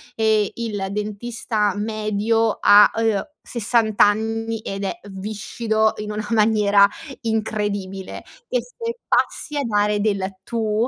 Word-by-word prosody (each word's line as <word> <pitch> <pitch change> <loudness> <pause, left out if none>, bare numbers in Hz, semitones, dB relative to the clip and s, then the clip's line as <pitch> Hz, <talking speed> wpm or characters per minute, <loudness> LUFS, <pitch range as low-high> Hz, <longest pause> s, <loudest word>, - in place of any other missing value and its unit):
ehm, 220 -2 +2
il 210 -4 -3
dentista 210 0 -2
medio 215 +1 0
ha, 205 0 +7
uhm, 225 -3 0 0.2
60 225 -2 0
anni, 225 +2 +2
ed 195 -1 -4
è 345 - -3
viscido 215 +2 -1
in 210 0 -5
una 210 0 -4
maniera 210 -2 +4 0.3
incredibile, 205 -4 -3 0.2
e - - 0
se 470 -1 -6
passi 300 - 0
a 285 - 0
dare 210 -2 +1
del 195 -2 -1
tu 220 +1 0
215 Hz, 120 wpm, -21 LUFS, 205-225 Hz, 0.3 s, ha